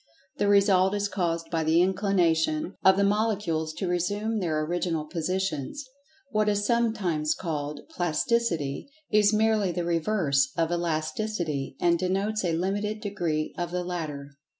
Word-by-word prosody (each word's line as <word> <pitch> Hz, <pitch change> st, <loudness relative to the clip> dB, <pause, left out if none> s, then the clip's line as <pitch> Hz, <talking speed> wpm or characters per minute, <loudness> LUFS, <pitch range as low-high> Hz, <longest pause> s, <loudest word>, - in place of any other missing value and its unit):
The 205 Hz, -, +1 dB
result 195 Hz, -1 st, +4 dB
is 205 Hz, 0 st, 0 dB
caused 170 Hz, -4 st, -2 dB
by 165 Hz, -1 st, 0 dB
the 160 Hz, +2 st, +3 dB
inclination 175 Hz, -3 st, +1 dB
of 190 Hz, 0 st, +6 dB
the 200 Hz, -, +3 dB
molecules 200 Hz, -6 st, 0 dB
to 190 Hz, -, -3 dB
resume 205 Hz, +5 st, -1 dB
their 155 Hz, -4 st, -1 dB
original 170 Hz, -2 st, -1 dB
positions. 180 Hz, -, -3 dB, 0.4 s
What 215 Hz, -2 st, +2 dB
is 205 Hz, 0 st, 0 dB
sometimes 205 Hz, -10 st, +1 dB
called 150 Hz, -4 st, -4 dB
"Plasticity" 175 Hz, -, -1 dB, 0.2 s
is 210 Hz, -1 st, +5 dB
merely 215 Hz, -3 st, +2 dB
the 175 Hz, 0 st, -2 dB
reverse 165 Hz, -6 st, +1 dB
of 165 Hz, 0 st, +1 dB
Elasticity, 165 Hz, -2 st, -2 dB
and 170 Hz, -1 st, +3 dB
denotes 195 Hz, +4 st, 0 dB
a 170 Hz, -2 st, 0 dB
limited 205 Hz, +4 st, -1 dB
degree 170 Hz, -7 st, -2 dB
of 175 Hz, -1 st, -2 dB
the 180 Hz, 0 st, -2 dB
latter. 155 Hz, -6 st, -5 dB
180 Hz, 140 wpm, -27 LUFS, 160-205 Hz, 0.4 s, of